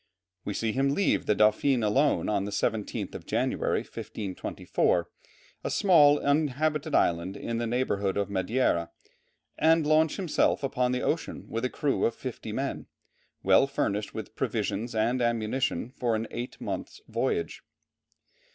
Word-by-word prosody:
We 100 - -4
see 115 -1 0
him 135 +3 +1
leave 200 - +2
with - - -17
the 105 - +3
Dauphine 110 +4 +3
alone 135 +8 +2
on 100 -2 0
the 105 - -5
17th 110 -1 -2
of - - -9
January, - - 0
1524, 95 -4 -2 0.6
a - - -2
small 150 -7 +5
inhabited 150 +1 0
island 85 +3 +1
in 115 0 -3
the 120 - -1
neighbourhood 105 -6 0
of 100 -1 0
Madeira, 95 -3 0 0.7
and 160 0 +4
launch 155 +1 +3
himself 180 -5 +1
upon 125 -2 0
the 125 0 -1
ocean - - -2
with 115 +1 -3
a - - 0
crew 140 +1 0
of 115 - 0
fifty - - -6
men, - - -3 0.6
well 95 +8 +5
furnished 105 -6 -1
with - - -7
provisions 115 +1 -2
and 120 +4 +1
ammunition 120 +1 0
for 120 -4 -1
an 110 +1 -2
eight 120 +1 -6
months' - - -5
voyage. 425 -2 -2
120 Hz, 150 wpm, -28 LUFS, 105-145 Hz, 0.7 s, small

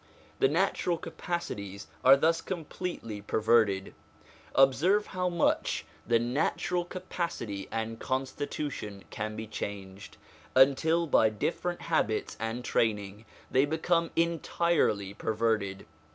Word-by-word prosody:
The - - +5
natural 175 +2 +1
capacities 100 - -5 0.2
are 135 +1 +8
thus 165 +3 +2
completely 165 - -5
perverted. 105 -2 +2 0.6
Observe 155 +11 +4
how 180 -2 -1
much 170 -2 +1 0.2
the 120 0 +4
natural 150 +8 0
capacity 170 - -4
and 115 0 -3
constitution 130 -5 -3
can 110 0 -4
be 110 - -5
changed, 100 -2 -7 0.4
until 140 +6 +5
by 110 -8 +4
different 170 +11 -2
habits 115 -10 0
and 115 +2 -3
training 105 -1 0 0.3
they 130 +2 +4
become 165 +2 +1
entirely 165 - +1
perverted. 110 -3 -1
130 Hz, 105 wpm, -29 LUFS, 110-170 Hz, 0.6 s, are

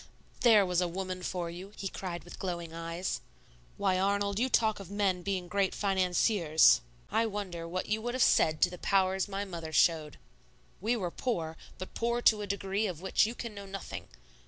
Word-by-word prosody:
"There 220 -5 +6
was 180 -1 +1
a 180 - +1
woman 185 +1 -4
for 175 -2 -3
you!" 185 +4 -9
he 195 - -3
cried 180 -2 -5
with 175 - -11
glowing 170 -3 -4
eyes. 165 +2 -3 0.6
"Why, 190 -2 +1
Arnold, 200 +1 +1
you 255 +2 +2
talk 220 -4 +2
of 195 -3 -9
men 195 -3 0
being 185 -1 -2
great 195 +1 0
financiers; 180 - +4 0.3
I 225 - +2
wonder 190 -5 -5
what 185 +2 -3
you 215 +1 0
would 240 +2 -3
have 255 - +4
said 155 -1 +3
to 180 - +4
the 180 - -8
powers 190 -1 +2
my 200 0 -3
mother 170 -4 -6
showed. 155 -2 +2 0.6
We 225 +5 +1
were 185 -7 -2
poor, 165 -11 -2 0.2
but 185 - -8
poor 235 +1 0
to 220 -3 +4
a 205 - -4
degree 200 +2 -1
of 175 -4 -6
which 190 +2 +3
you 230 - -5
can 235 -2 -6
know 200 -1 -8
nothing. 195 0 -7
190 Hz, 195 wpm, -31 LUFS, 175-205 Hz, 0.6 s, There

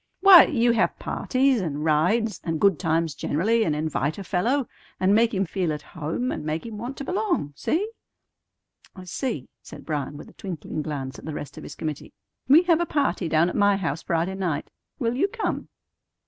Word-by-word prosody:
"Why, 380 -2 +10
you 240 -5 +2
have 230 -1 +1
parties, 260 -3 +1
and 150 -3 -3
rides, 185 +9 +1
and 165 -2 -2
good 195 -5 +3
times 165 -2 0
generally, 215 +11 +1
and 155 -8 0
invite 155 0 -1
a 200 - -6
fellow, 230 +9 0 0.3
and 190 +2 +3
make 225 +2 +4
him 195 -3 0
feel 180 -2 -1
at 150 -1 -5
home, 165 - -3
and - - -4
make 155 +4 -3
him 220 -2 -7
want 245 +4 -6
to - - -5
belong. 360 - -1
See?" 345 - 0 1.1
"I 185 - -9
see," 180 - -4
said - - -12
Bryan, 145 -2 -3
with - - -10
a - - -16
twinkling 170 -5 -5
glance 135 -3 -5
at - - -12
the 155 -1 -5
rest 145 - -7
of - - -9
his 150 - -9
committee. 155 -2 -5 0.3
"We 300 +7 +7
have 345 -2 +3
a 345 - -1
party 275 - 0
down 160 +1 +3
at 180 - -3
my 205 -1 +4
house 165 -5 -2
Friday 170 +3 -1
night. 180 -6 -3 0.3
Will 235 -4 0
you 330 +10 +2
come?" 445 +3 -3
190 Hz, 200 wpm, -25 LUFS, 155-240 Hz, 1.1 s, Why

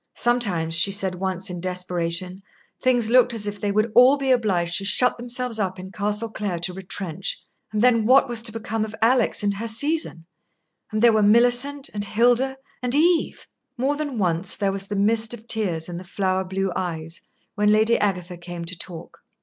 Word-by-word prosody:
Sometimes, 200 -10 +1
she 170 +4 +4
said 195 -2 0
once 185 0 -2
in 175 -1 -6
desperation, 180 0 -2 0.4
things 245 -3 +2
looked 245 -1 +4
as 210 -2 0
if 205 0 -5
they 205 - 0
would 215 +2 +1
all 255 +3 +6
be 270 -1 0
obliged 180 -8 +1
to - - -6
shut 225 +6 +2
themselves 245 -1 -3
up 190 -2 -2
in 185 +1 -9
Castle 210 +3 -2
Clare 205 -5 -3
to 175 +2 -4
retrench; 190 -1 -4 0.3
and 215 +1 -1
then 230 -3 +3
what 270 +2 +5
was 240 -2 +1
to 230 - 0
become 225 0 -3
of 220 0 -6
Alix 240 -2 +2
and 200 0 +1
her 230 +3 -4
season? 230 - -1 0.7
And 215 +1 -1
there 235 -1 +6
were 215 - +3
Millicent 245 +6 +3
and 205 -1 -2
Hilda 245 +5 +2 0.2
and 250 +1 0
Eve. 335 +3 +1 0.3
More 270 +4 0
than 290 -4 -4
once 180 -2 -1
there 200 -1 0
was 195 0 -5
the 205 - -4
mist 220 +3 +1
of 230 0 -17
tears 180 -9 -1
in 175 -1 -6
the - - -9
flower 190 0 -1
blue 190 +1 -2
eyes 165 -2 -4 0.3
when 210 0 +2
Lady 220 +2 +3
Agatha 180 -3 -2
came 175 0 -7
to 185 +2 -6
talk. 170 -1 -10
210 Hz, 195 wpm, -23 LUFS, 185-240 Hz, 0.7 s, all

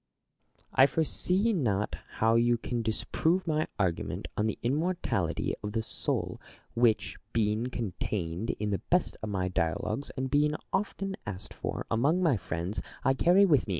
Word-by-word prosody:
Plato. - - -35
I 130 - +8
foresee 180 +8 +1
not 105 - 0 0.2
how 115 +1 +3
you 120 +1 +4
can 120 +1 -2
disprove 160 +10 0
my 155 -2 +1
argument 95 -5 -1
on 105 - +1
the 110 - -2
immortality 140 - 0
of 105 0 -4
the 110 -1 0
soul, - - -2 0.3
which, 115 -2 +2 0.2
being 110 +1 +1
contained 100 -4 -3
in 105 0 -1
the 100 - -1
best 180 0 +2
of 110 - -3
my 95 -2 0
dialogues, 90 - -1
and 130 0 -2
being 150 +1 +3 0.2
often 195 -1 -1
asked 95 -2 -5
for - - -4
among 145 +11 +3
my 155 -7 +4
friends, 90 +1 -3 0.2
I 135 - +4
carry 180 +8 +5
with 145 -11 +3
me. - - -7
120 Hz, 160 wpm, -30 LUFS, 105-155 Hz, 0.3 s, I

